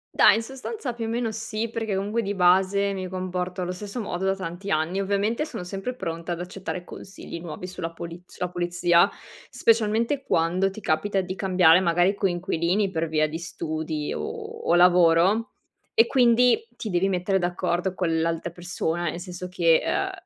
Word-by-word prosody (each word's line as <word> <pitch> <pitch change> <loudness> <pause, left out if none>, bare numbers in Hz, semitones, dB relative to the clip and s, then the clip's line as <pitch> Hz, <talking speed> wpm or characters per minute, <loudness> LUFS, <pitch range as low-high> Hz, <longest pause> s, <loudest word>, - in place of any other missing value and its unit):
Dai, - - +7
in 225 - -1
sostanza 265 - -5
più 230 -1 -4
o - - -3
meno 230 0 -1
sì, 220 +1 -4
perché 225 -3 -2
comunque 205 +4 -1
di 205 -1 -3
base 190 +2 +3
mi 190 -1 -4
comporto 185 0 -3
allo 180 - -3
stesso 200 +5 -6
modo 190 -4 -3
da 195 0 +2
tanti 190 +1 -6
anni. 170 +3 0
Ovviamente 200 +6 0
sono 305 - -6
sempre 195 +7 -5
pronta 165 -4 -4
ad 170 - -6
accettare 180 0 -5
consigli 180 -2 -9
nuovi 170 +1 -7
sulla 180 -2 -5
puliz 170 +1 -8
sulla 180 - -4
pulizia, 175 +1 +3 0.4
specialmente 230 +4 +2
quando 180 0 +1
ti 205 +3 -10
capita 195 +5 0
di 185 0 -3
cambiare 180 -3 +5
magari 175 +1 +3
coinquilini 185 0 0
per 165 -2 -1
via 155 -1 +2
di 160 +2 -5
studi 155 -2 -4
o - - -4 0.4
o - - +4
lavoro 180 +4 +4 0.4
e 225 - +6
quindi 245 - +4
ti 215 - -5
devi 180 +2 +2
mettere 190 +1 +1
d'accordo 180 +1 -1
con 165 -3 0
l'altra 165 +1 -1
persona, 175 -1 -3
nel 170 - -5
senso 180 0 -7
che, 170 -3 +4
ehm, - - -1
185 Hz, 175 wpm, -25 LUFS, 175-205 Hz, 0.4 s, Dai